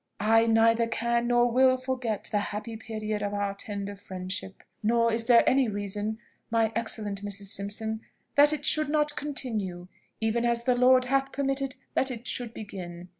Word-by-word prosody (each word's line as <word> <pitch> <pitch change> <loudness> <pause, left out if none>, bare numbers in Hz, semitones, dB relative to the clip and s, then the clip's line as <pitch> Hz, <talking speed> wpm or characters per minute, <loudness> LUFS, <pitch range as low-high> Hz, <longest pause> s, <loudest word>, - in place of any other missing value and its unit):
"I 225 +1 +5
neither 230 +1 +4
can 235 +1 0
nor 240 0 +3
will 260 +1 +4
forget 255 -4 -3
the 210 - +2
happy 210 +3 -5
period 215 -1 -4
of 205 0 -2
our 200 -1 -1
tender 200 0 -6
friendship. 190 0 -6 0.2
Nor 230 +1 +2
is 225 0 -1
there 235 -1 +5
any 265 -1 +4
reason, 205 +1 -3 0.3
my 225 -1 +2
excellent 210 -3 -2
Mrs. 200 -1 -2
Simpson, 220 +2 0 0.3
that 290 +1 +6
it 300 -1 -3
should 305 -1 +3
not 300 0 +1
continue, 210 -11 -3 0.3
even 225 +1 0
as 235 0 +2
the 250 - +3
Lord 255 +1 +5
hath 270 +1 0
permitted 275 -1 -1 0.2
that 265 - +2
it 240 -1 -6
should 245 -2 0
begin. 180 -5 -8
225 Hz, 170 wpm, -27 LUFS, 205-250 Hz, 0.3 s, that